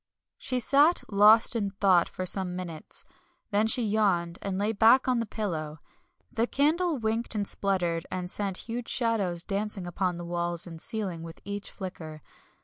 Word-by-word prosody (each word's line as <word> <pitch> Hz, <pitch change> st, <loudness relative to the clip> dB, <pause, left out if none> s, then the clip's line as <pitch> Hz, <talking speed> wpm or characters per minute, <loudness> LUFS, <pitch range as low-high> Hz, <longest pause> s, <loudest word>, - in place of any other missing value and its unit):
She 255 Hz, -1 st, -2 dB
sat 285 Hz, +7 st, +4 dB
lost 215 Hz, +4 st, +6 dB
in 205 Hz, -3 st, 0 dB
thought 185 Hz, -4 st, +4 dB
for 185 Hz, -, -5 dB
some 185 Hz, -1 st, -1 dB
minutes, 170 Hz, -4 st, -6 dB, 0.5 s
then 210 Hz, +2 st, +2 dB
she 235 Hz, +2 st, +4 dB
yawned 195 Hz, -5 st, +1 dB
and 195 Hz, -1 st, -3 dB
lay 205 Hz, +2 st, 0 dB
back 225 Hz, +5 st, +5 dB
on 250 Hz, -2 st, +2 dB
the 230 Hz, -, -2 dB
pillow. 160 Hz, -8 st, -4 dB, 0.5 s
The 230 Hz, +1 st, 0 dB
candle 315 Hz, +4 st, +1 dB
winked 225 Hz, 0 st, -1 dB
and 205 Hz, -1 st, -1 dB
spluttered 175 Hz, -4 st, 0 dB
and 180 Hz, -1 st, -4 dB
sent 195 Hz, 0 st, -3 dB
huge 235 Hz, +1 st, -5 dB
shadows 200 Hz, -8 st, 0 dB
dancing 200 Hz, -1 st, -3 dB
upon 175 Hz, 0 st, -2 dB
the 175 Hz, -, -7 dB
walls 175 Hz, 0 st, -1 dB
and 165 Hz, -2 st, -8 dB
ceiling 195 Hz, -7 st, -2 dB
with 165 Hz, 0 st, -10 dB
each 200 Hz, 0 st, -5 dB
flicker. 160 Hz, -6 st, -8 dB
200 Hz, 165 wpm, -28 LUFS, 175-225 Hz, 0.5 s, lost